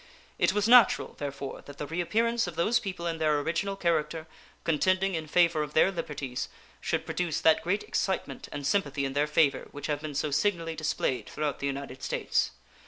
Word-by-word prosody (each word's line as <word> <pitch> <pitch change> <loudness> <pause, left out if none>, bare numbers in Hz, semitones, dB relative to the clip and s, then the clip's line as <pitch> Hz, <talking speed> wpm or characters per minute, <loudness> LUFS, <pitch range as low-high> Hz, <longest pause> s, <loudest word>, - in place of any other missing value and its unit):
It - - +4
was 210 +1 +1
natural, 245 0 +6
therefore, 140 -1 -5
that 145 0 -10
the 150 - -4
reappearance 220 +9 0
of 175 - -6
those 215 +8 +2
people 185 -3 -5
in 165 -1 -2
their 155 -2 +2
original 170 +6 -1
character, 165 -3 0 0.4
contending 185 +4 +2
in 160 -2 -3
favor 170 -1 +3
of 150 0 -5
their 190 - +5
liberties, 150 -7 -4 0.3
should - - -1
produce 175 -3 -1
that 160 -1 +5
great 200 +4 0
excitement 185 -8 -2
and 145 - -5
sympathy 145 -4 +1
in 135 - -3
their 145 +1 +2
favor 150 -2 +2
which 145 - -8
have 145 -1 -1
been 155 -2 -6
so 150 +1 -1
signally 165 +1 0
displayed 155 -7 -1
throughout 150 -3 -2
the 140 - -1
United 135 -1 -5
States. - - 0
160 Hz, 185 wpm, -28 LUFS, 145-180 Hz, 0.4 s, natural